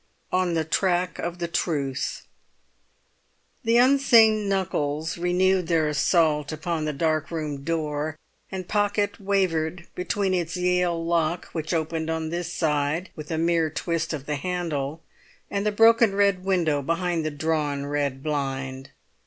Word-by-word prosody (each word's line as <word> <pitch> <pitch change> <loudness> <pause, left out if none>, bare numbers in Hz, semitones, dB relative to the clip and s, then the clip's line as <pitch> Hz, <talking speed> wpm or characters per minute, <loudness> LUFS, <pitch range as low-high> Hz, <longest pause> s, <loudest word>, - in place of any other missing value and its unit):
ON 180 -2 +1
THE 160 -1 0
TRACK 180 +2 0
OF 175 0 -3
THE 170 -1 -2
TRUTH 140 -6 -2 1.4
The 230 0 +3
unseen 230 -5 +5
knuckles 160 -5 -1
renewed 180 +1 +2
their 160 -2 +2
assault 150 0 +2
upon 155 0 -2
the 155 - 0
dark 155 +1 0
room 150 -4 -4
door; 155 -1 -2 0.3
and 185 -2 -5
Pocket 205 0 0
wavered 180 -4 0
between 190 +1 -1
its 170 -1 -1
Yale 180 -2 +1
lock, 170 0 0
which 160 -2 -4
opened 160 -1 -1
on 160 -1 -2
this 175 0 -3
side 150 +2 0
with 155 -1 -8
a 160 - -1
mere 165 -1 +2
twist 165 +1 -2
of 145 -4 -5
the 150 -1 -2
handle, 160 -3 -3 0.5
and 200 +1 -1
the - - +2
broken 225 -1 +5
red 200 -2 +2
window 170 -7 +1
behind 170 +2 -1
the 155 - -1
drawn 145 -2 -1
red 140 -2 -2
blind. 135 -2 -3
165 Hz, 145 wpm, -25 LUFS, 150-185 Hz, 1.4 s, unseen